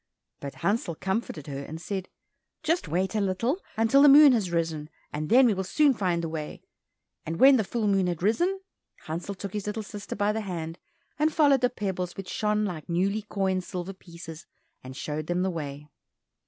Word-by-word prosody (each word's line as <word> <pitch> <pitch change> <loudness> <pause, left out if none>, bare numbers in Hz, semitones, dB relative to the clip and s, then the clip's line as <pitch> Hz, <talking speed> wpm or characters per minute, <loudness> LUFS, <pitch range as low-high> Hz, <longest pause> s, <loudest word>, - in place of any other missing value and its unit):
But 140 -1 -7
Hansel 200 -5 0
comforted 190 - -3
her 140 -2 -5
and 155 +3 -7
said, 190 +1 -4 0.5
"Just 320 - 0
wait 185 +6 -1
a 215 - +1
little, 230 - 0 0.2
until 225 +5 +4
the 290 - +8
moon 290 0 +9
has 210 -7 0
risen, 165 -3 -2 0.2
and 150 +1 -3
then 255 +3 +7
we 230 - +4
will 190 0 -2
soon 285 +9 +3
find 180 -6 -1
the - - -1
way." 160 -2 -6 0.6
And 165 +1 -5
when 270 0 +8
the 220 - +1
full 225 +2 -2
moon 195 -2 +2
had 175 -1 -3
risen, 350 - +1 0.4
Hansel 170 +5 -4
took 195 0 -7
his 210 -1 -4
little 215 +1 -3
sister 205 -1 -7
by 205 +1 +1
the 220 +1 -2
hand, 170 -4 -5 0.4
and 310 +1 +3
followed 285 -4 +4
the 250 - +3
pebbles 190 -6 -4
which 195 -1 -7
shone 210 -1 0
like 175 -5 -6
newly 195 +5 +1
coined 190 -2 0
silver 180 +2 -5
pieces, 170 -3 -11 0.4
and 130 +1 -9
showed 155 0 -4
them 175 +1 0
the 190 - 0
way. 150 -3 -6
190 Hz, 195 wpm, -27 LUFS, 165-220 Hz, 0.6 s, moon